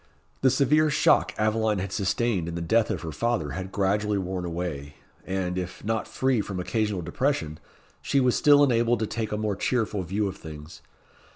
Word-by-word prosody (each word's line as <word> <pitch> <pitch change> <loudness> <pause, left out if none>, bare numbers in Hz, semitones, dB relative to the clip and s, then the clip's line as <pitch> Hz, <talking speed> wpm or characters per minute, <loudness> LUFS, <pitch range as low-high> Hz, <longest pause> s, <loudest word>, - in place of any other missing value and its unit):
The 130 - +5
severe 150 +4 +3
shock 145 - +3
Aveline 110 0 +1
had 95 0 -3
sustained 100 -2 0
in 85 - -4
the 85 - -3
death 110 +6 +2
of - - -3
her 80 - -4
father 85 -4 -1
had 95 +1 -5
gradually 105 +1 +1
worn 95 -1 -3
away, 80 -4 -5 0.3
and, 95 -1 -2
if 90 +2 -7
not 110 0 -1
free 130 -4 +1
from 95 -2 -5
occasional 105 -1 -1
depression, 80 - -1 0.4
she 140 - +1
was 125 -2 +3
still 145 -1 +6
enabled 120 -2 +3
to - - +1
take 110 0 -4
a 105 - -1
more 105 -2 -1
cheerful 110 -3 -1
view 100 +3 -1
of 95 0 -6
things. 75 -1 -10
105 Hz, 185 wpm, -26 LUFS, 90-115 Hz, 0.4 s, still